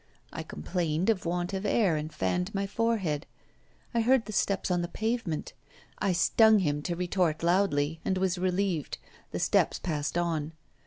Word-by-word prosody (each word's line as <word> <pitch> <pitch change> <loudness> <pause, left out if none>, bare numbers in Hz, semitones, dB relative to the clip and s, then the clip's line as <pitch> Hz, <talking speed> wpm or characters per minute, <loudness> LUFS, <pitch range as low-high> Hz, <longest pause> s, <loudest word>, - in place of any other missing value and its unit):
I - - -4
complained 170 - -1
of 185 -5 -3
want 175 +2 -1
of 190 0 -2
air 205 -4 +2
and 155 +1 -3
fanned 180 +6 -1
my 195 0 0
forehead. 195 -8 -1 0.7
I 235 - +2
heard 245 +1 +3
the 215 - -6
steps 195 -1 0
on 175 -1 +2
the 175 - -2
pavement; 220 -3 -2 0.5
I 200 - +1
stung 220 +5 +5
him 150 -6 0
to 175 +3 -2
retort 175 -2 0
loudly, 165 -4 +2
and 190 - 0
I - - -2
was 185 -1 +1
relieved; 185 -3 -1 0.3
the - - -4
steps - - +2
passed 155 -1 -2
on. 165 -3 -1
180 Hz, 170 wpm, -29 LUFS, 165-200 Hz, 0.7 s, stung